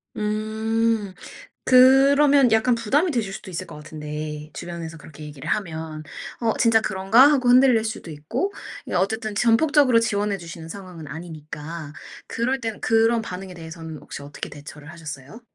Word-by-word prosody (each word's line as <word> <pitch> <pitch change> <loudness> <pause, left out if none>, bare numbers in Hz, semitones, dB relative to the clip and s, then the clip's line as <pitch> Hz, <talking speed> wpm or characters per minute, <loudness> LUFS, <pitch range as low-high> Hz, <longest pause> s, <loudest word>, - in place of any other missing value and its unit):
음. 215 0 -1 0.5
그러면 270 +1 +6
약간 220 +3 +4
부담이 270 - +1
되실 225 -8 -2
수도 195 - -8
있을 185 +1 -5
것 165 - -11
같은데, 150 0 -7
주변에서 165 -1 -7
그렇게 155 0 -12
얘기를 145 -3 -9
하면. 160 -6 -3 0.4
어 230 -2 +2
'진짜 230 -2 +4
그런가?' 210 +9 +5
하고 260 -4 +2
흔들릴 250 -2 +6
수도 220 -6 -5
있고 155 - -3 0.3
이 - - -7
어쨌든 210 +4 -1
전폭적으로 255 +3 +4
지원해 205 -2 0
주시는 170 -2 -9
상황은 180 -3 -9
아니니까. 155 0 -8 0.3
그럴 255 +4 -1
때는 225 -3 -4
그런 225 +1 +3
반응에 185 -2 -7
대해서는 160 -1 -8
혹시 140 - -9
어떻게 145 0 -7
대처를 145 +1 -11
하셨어요? 155 - -9
200 Hz, 360 characters per minute, -23 LUFS, 160-230 Hz, 0.5 s, 그러면